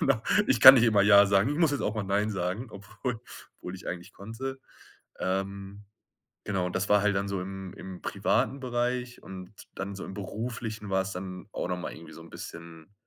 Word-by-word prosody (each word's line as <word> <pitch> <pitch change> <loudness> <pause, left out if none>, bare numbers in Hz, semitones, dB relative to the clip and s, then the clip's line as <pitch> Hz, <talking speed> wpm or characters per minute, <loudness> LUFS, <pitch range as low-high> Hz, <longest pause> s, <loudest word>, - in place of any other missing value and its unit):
genau. 135 -5 +2 0.3
Ich 120 - +3
kann 130 +2 +13
nicht 120 - +4
immer 105 -4 +4
Ja 100 0 +7
sagen, 100 +4 +3
ich 145 - -1
muss 165 -4 +4
jetzt 145 - -1
auch 105 - -1
mal 110 - -2
Nein 100 +2 0
sagen, 95 +4 -2
obwohl 110 +4 -5 0.4
obwohl 90 +1 -7
ich - - -12
eigentlich 90 +2 -6
konnte. 120 +7 -6 0.6
Ähm, 100 +2 -3 0.6
genau, 95 -3 -1
und 90 - -5
das 95 - 0
war 105 -1 +5
halt 105 -1 +2
dann 100 +1 -1
so 100 -2 -2
im 95 0 -6
im 95 -2 -9
privaten 130 +6 0
Bereich 125 -1 -2
und 95 +1 -9 0.2
dann 100 +1 -4
so 95 - -7
im - - -8
Beruflichen 110 +1 -5
war's 95 0 0
dann 90 +1 -7
auch - - -3
noch 90 0 -2
mal 90 - -5
irgendwie 80 - -12
so - - -11
'n 85 - -13
bisschen 85 +2 -10
100 Hz, 205 wpm, -28 LUFS, 95-115 Hz, 0.6 s, kann